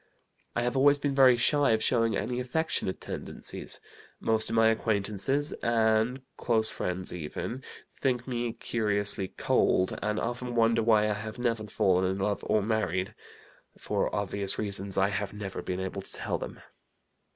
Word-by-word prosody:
"I 120 - +1
have 120 +1 -1
always 140 +2 +5
been 145 -1 -1
very 130 -3 +6
shy 145 +1 +3
of 110 - +1
showing 115 -4 +2
any 125 0 -2
affectionate 125 - -1
tendencies. - - -5 0.4
Most 110 0 +1
of 115 - -2
my 110 0 +5
acquaintances 110 +6 0
(and 115 +2 +2
close 110 -2 +1
friends 90 0 -3
even) 90 - -5 0.4
think 125 -2 0
me 120 -2 -2
curiously 105 -4 +1
cold, 95 0 +1
and 105 0 -1
often 120 +1 -3
wonder 115 0 +3
why 110 -2 +4
I 105 - +1
have 110 +2 -6
never 115 -3 -1
fallen 95 -3 +2
in 95 - -2
love 100 +1 -1
or 105 - +2
married. 100 -4 -1 0.6
For - - -1
obvious 100 -1 -1
reasons 100 -2 0
I 95 +1 +3
have 100 0 -3
never 100 -2 -5
been 90 0 -3
able 95 +1 -4
to - - -10
tell - - -3
them. - - -7
110 Hz, 160 wpm, -29 LUFS, 100-120 Hz, 0.6 s, very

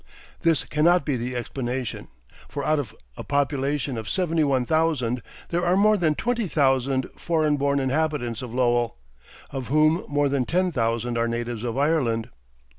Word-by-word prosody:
This 165 -6 +2
cannot 165 +1 +3
be 145 - 0
the 125 +1 -3
explanation; 125 -1 -4 0.4
for 140 -1 -4
out 155 -1 +2
of 115 -6 -5 0.2
a - - -6
population 140 -2 -1
of 110 - -6
seventy 165 -4 +1
one 135 -3 +1
thousand, 145 -6 +1 0.3
there 175 +1 0
are 180 +1 +3
more 215 +2 +5
than 165 -6 +1
twenty 235 +1 -1
thousand 135 -3 +1
foreign 155 -3 +1
born 140 0 +1
inhabitants 135 -4 -1
of 125 -3 -6
Lowell, 120 -1 +1 0.5
of 130 -3 -5
whom 155 +4 +3
more 145 0 +1
than 135 -2 0
ten 180 +4 +1
thousand 115 -2 -1
are 115 - +1
natives 120 -1 -3
of 120 0 -3
Ireland. 135 -7 +1
140 Hz, 165 wpm, -24 LUFS, 120-155 Hz, 0.5 s, more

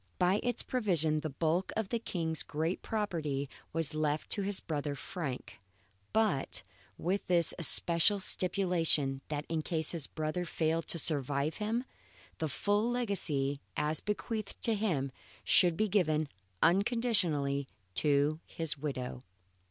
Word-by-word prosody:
By 185 +3 +3
its 245 0 +3
provisions 165 - +1
the 155 - -3
bulk 165 +6 0
of 220 -3 -1
the 235 - 0
King's 165 -7 -1
great 160 +4 -2
property 160 -10 -2 0.2
was 165 -1 0
left 155 -1 -1
to 205 - +1
his 195 0 +1
brother 145 -2 -3
Frank, 135 -7 -5 0.5
but 210 - +1 0.3
with 190 +4 -1
this 170 -3 +4
especial 170 +4 +5
stipulation 175 -8 +1
that 150 0 -3
in 160 -1 -1
case 160 -1 -1
his 165 -5 -3
brother 155 +3 -2
failed 165 -1 -1
to - - +4
survive 145 -1 +1
him, 225 +3 -1 0.6
the 160 - 0
full 205 - +1
legacy 165 - 0 0.2
as 150 +1 0
bequeathed 210 0 -3
to 230 - +5
him 170 -11 0 0.3
should 175 -2 +4
be 215 - +2
given 155 -7 +2 0.4
unconditionally 175 - +2 0.3
to 145 - +2
his 155 -3 -3
widow. 130 -4 -4
165 Hz, 135 wpm, -32 LUFS, 150-200 Hz, 0.6 s, especial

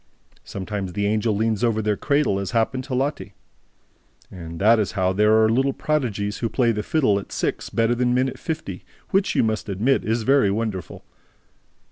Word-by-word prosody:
Sometimes 100 -1 -5
the 100 +1 -1
Angel 105 +1 +1
leans 110 +1 0
over 115 -2 +2
their 105 -1 0
cradle, 140 -6 +1
as 100 -2 -4
happened 130 +3 0
to 130 - -3
Lotte, 140 +3 -2 1.0
and 85 -2 -8
that 110 +4 +5
is 105 - -1
how 95 -2 +1
there 105 +3 +4
are - - +5
little 135 +5 +1
prodigies 110 -11 -2
who 115 - -1
play 120 -1 +2
the 105 -1 -2
fiddle 105 -6 +1
at 100 - -11
six - - -2
better 115 +1 +1
than 125 0 +1
men 130 +1 +2
at 130 - -7
fifty, 155 - -5 0.3
which, 195 0 +1
you - - +3
must 110 -1 -2
admit, 110 +8 +1
is 115 +1 -1
very 135 -4 +4
wonderful. 105 -3 -4
110 Hz, 185 wpm, -23 LUFS, 100-125 Hz, 1.0 s, that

